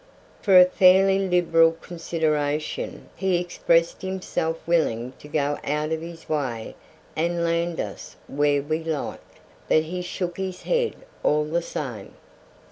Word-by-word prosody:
For 190 -3 +7
a 180 - +9
fairly 190 +1 +5
liberal 165 -2 +4
consideration 155 -3 -2
he 190 -2 +1
expressed 170 -1 +1
himself 185 -3 -2
willing 130 -8 +1
to - - -12
go 145 -1 -1
out 150 +2 -1
of 160 0 -1
his 165 0 -10
way 130 -7 -3 0.4
and 170 +1 0
land 170 0 0
us - - -6
where 145 0 +1
we 155 +2 -2
liked, 160 -3 -5 0.3
but 155 - +4
he 180 +3 -4
shook 175 -1 -4
his 190 -1 -4
head 485 -2 0 0.3
all 150 0 +2
the 165 +3 -1
same. 125 -11 -6
165 Hz, 135 wpm, -24 LUFS, 150-180 Hz, 0.4 s, a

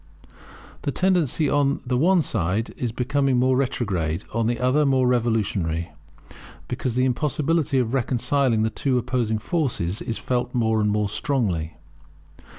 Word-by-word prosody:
The 140 - -2
tendency 170 -4 +1
on 140 0 +1
the 125 0 -1
one 170 +6 +3
side 105 0 -1
is 120 -3 -3
becoming 135 +2 0
more 130 +1 +3
retrograde, 100 -10 -1
on 115 -1 0
the 120 0 -1
other 130 +4 +2
more 135 -2 +2
revolutionary; 100 -9 0 0.8
because 125 -3 -3
the 130 +1 +2
impossibility 150 +2 0
of 125 -2 0
reconciling 130 -2 +1
the 110 - 0
two 130 +3 0
opposing 120 -3 0
forces 110 - -2
is 115 - -3
felt 125 0 -2
more 110 -2 +2
and 105 - +2
more 105 0 +1
strongly. 100 - -1
125 Hz, 145 wpm, -23 LUFS, 110-135 Hz, 0.8 s, one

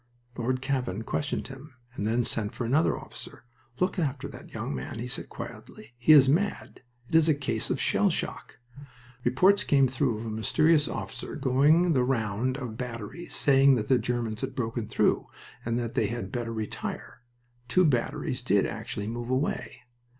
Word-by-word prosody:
Lord 130 +2 -1
Cavan 125 -7 -1
questioned 145 +5 -2
him, 135 +1 -11 0.2
and 105 -4 -3
then 120 +2 +1
sent 110 +1 -1
for 120 - -3
another 145 +8 +2
officer. - - -10 0.4
"Look 185 +1 0
after 140 -5 -2
that - - -12
young - - -4
man," 65 - -5
he 120 +2 -4
said, 125 - -4
quietly. 110 +3 -10
"He 120 +6 +4
is 140 -3 +9
mad. 180 +9 0 0.3
It - - -14
is 160 0 +5
a 155 - +4
case 140 -1 -2
of - - 0
shell - - +3
shock." - - -4 0.7
Reports 180 +12 +4
came 135 -2 +4
through 130 -3 0
of 110 - -6
a - - -3
mysterious 150 +8 +3
officer - - -5
going 150 +6 +4
the 130 -3 +3
round 125 0 0
of 125 -4 -5
the - - -8
batteries, 115 +6 -6
saying 135 -1 +5
that 105 -3 -3
the 130 - +5
Germans 115 -2 -2
had 130 0 -4
broken 115 -3 -2
through 110 - +1 0.4
and 115 0 -1
that 120 -1 -3
they 110 - +1
had 110 -3 -5
better 120 -2 -3
retire. 110 +1 -5 0.5
Two 180 +9 +4
batteries 125 -1 0
did 100 -6 +2
actually 100 - -4
move 120 +2 -4
away. 130 -3 -2
125 Hz, 180 wpm, -28 LUFS, 115-140 Hz, 0.7 s, is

